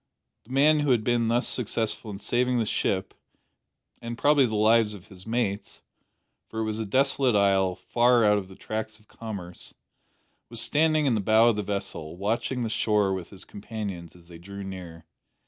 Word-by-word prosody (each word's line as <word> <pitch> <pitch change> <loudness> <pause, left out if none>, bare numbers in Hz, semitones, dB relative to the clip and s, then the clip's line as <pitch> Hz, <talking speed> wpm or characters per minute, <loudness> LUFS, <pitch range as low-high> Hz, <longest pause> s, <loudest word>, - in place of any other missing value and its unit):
The 120 - -15
man 150 +3 +4
who 145 -1 0
had 120 -4 +3
been 120 0 +1
thus 120 +2 +2
successful 110 -2 -1
in 100 - -6
saving 125 +4 0
the 115 - +1
ship, 95 -2 -1 0.9
and 115 0 -6
probably 145 -1 +4
the 110 - -3
lives 110 0 +3
of 100 0 -15
his 95 0 -14
mates 110 -3 -3 0.7
for 110 - -4
it - - 0
was 110 0 -2
a 110 - -3
desolate 130 +1 +2
isle, 95 -2 +3
far 120 +2 +2
out 105 0 +4
of 95 - -8
the 95 - -13
tracks 110 +1 -5
of 105 - -26
commerce 100 -6 -8 0.7
was - - -4
standing 155 0 +2
in 130 - +2
the 110 - 0
bow 110 +3 +5
of 115 - +1
the 105 - -1
vessel, 100 -5 -5
watching 115 +5 -1
the - - -1
shore 105 -3 +1
with 95 -3 -5
his 95 -2 -12
companions 100 -5 -7
as 85 -1 -18
they 85 -1 -12
drew 100 +3 -9
near. 90 -4 -9
110 Hz, 190 wpm, -26 LUFS, 95-120 Hz, 0.9 s, bow